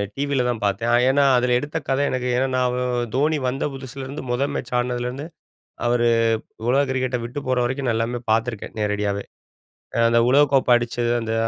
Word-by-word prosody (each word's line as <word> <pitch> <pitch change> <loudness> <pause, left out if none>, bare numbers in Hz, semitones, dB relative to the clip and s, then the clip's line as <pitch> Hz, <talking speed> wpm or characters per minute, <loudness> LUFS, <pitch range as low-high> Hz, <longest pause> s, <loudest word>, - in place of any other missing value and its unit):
டிவியில் 140 -3 0
தான் 115 -2 -2
பார்த்தேன் 115 +4 0 0.2
ஏன்னா 140 +2 +4
அதில 125 0 +2
எடுத்த 145 +4 -4
கத 135 +1 +1
எனக்கு 125 -1 -2
ஏன்னா 130 +2 +1
நான் 125 -1 0
தோனி 150 +3 +2
வந்த 135 +3 -1
புதுசுலேருந்து 135 +1 -7
முதல் 135 +4 0
மேட்ச் 120 - -5
ஆடுனதுலேருந்து 125 +3 -2 0.6
அவரு 120 0 +2 0.6
உலக 135 +3 +3
கிரிக்கெட்ட 130 -1 -1
விட்டு 120 +5 -5
போற 130 -1 +2
வரைக்கும் 130 +1 -2
நான் 115 - +1
எல்லாமே 120 +1 -2
பார்த்துருக்கேன் 115 -1 -2
நேரடியாவே 105 -1 -1 0.9
அந்த 115 0 +4
உலகக்கோப்பை 135 -2 +4
அடிச்சது 120 0 -1
அந்த 115 0 -3
125 Hz, 155 wpm, -22 LUFS, 120-135 Hz, 0.9 s, ஏன்னா